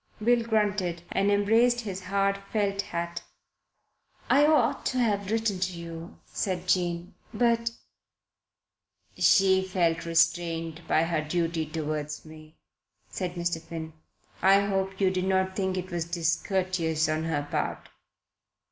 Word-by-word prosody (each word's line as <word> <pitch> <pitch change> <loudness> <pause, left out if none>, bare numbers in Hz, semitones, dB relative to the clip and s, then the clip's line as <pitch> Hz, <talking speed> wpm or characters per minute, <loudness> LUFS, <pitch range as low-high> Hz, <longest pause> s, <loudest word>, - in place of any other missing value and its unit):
Bill 235 +2 +3
grunted 205 -6 0
and 195 +1 +2
embraced 225 +4 +3
his 190 -4 -6
hard 200 0 +1
felt 200 -2 0
hat. 170 -2 -4 1.1
"I 290 +2 +6
ought 280 -4 +3
to 260 - -1
have 205 -5 +1
written 220 -3 0
to 185 0 -1
you," 170 0 -8
said 185 -2 -3
Jane 175 -1 0 0.2
"but 230 +1 +2 0.8
" - - -62 0.7
"She 190 -2 +5
felt 170 -3 0
restrained 165 -1 +1
by 160 - +3
her 165 -2 0
duty 165 0 -1
towards 150 -1 -4
me," 155 0 -13 0.6
said 180 -2 -4
Mr. 170 -1 -1
Finn. 160 -1 -7 0.5
"I 195 +1 +6
hope 195 -1 -1
you 190 -2 +3
did 185 0 -1
not 190 0 +1
think 190 -1 -1
it 185 +1 -5
was 170 -2 -2
discourteous 170 -1 0
on 155 +1 -1
her 145 -3 -2
part." - - -2
185 Hz, 135 wpm, -27 LUFS, 165-200 Hz, 1.1 s, I